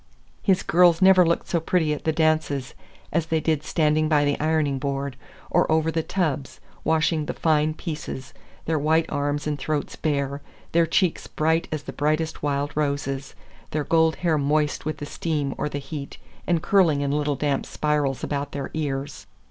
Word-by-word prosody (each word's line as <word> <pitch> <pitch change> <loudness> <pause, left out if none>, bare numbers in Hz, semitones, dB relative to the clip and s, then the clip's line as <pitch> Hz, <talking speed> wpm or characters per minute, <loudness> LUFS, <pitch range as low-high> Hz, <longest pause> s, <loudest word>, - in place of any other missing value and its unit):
His 190 -2 +2
girls 175 -1 +5
never 190 -1 +7
looked 170 0 0
so 170 - +1
pretty 160 -2 +1
at 150 - -7
the 160 - +3
dances 155 -4 0 0.4
as 165 0 +1
they 160 0 +1
did 155 -2 0
standing 155 0 +1
by 145 -2 +3
the 145 0 0
ironing 155 -3 +1
board, 140 -1 -3 0.4
or - - +3
over 160 0 +2
the 160 - 0
tubs, 155 -7 -2 0.2
washing 160 -1 +1
the - - -3
fine 155 -1 +2
pieces, 155 -6 -6 0.3
their 160 -1 0
white 160 +2 +3
arms 145 0 -1
and 150 -1 -2
throats 150 0 -2
bare, 140 -2 -1 0.3
their 165 0 +3
cheeks 175 +1 +1
bright 160 +2 +1
as 155 -2 -3
the - - -7
brightest 155 +2 -1
wild 145 0 -1
roses, 140 -2 -2 0.3
their 150 -1 -1
gold 160 +1 +3
hair 160 -3 +3
moist 150 +1 0
with 155 - -2
the 145 - -6
steam 145 -2 -2
or 150 - -2
the 145 - -4
heat 140 0 -7 0.3
and 170 -2 +1
curling 175 -8 +3
in 140 -1 0
little 145 0 0
damp 140 0 -1
spirals 150 -3 -1
about 145 -1 -3
their 140 -2 -4
ears. 145 -2 -4
150 Hz, 180 wpm, -24 LUFS, 145-160 Hz, 0.4 s, never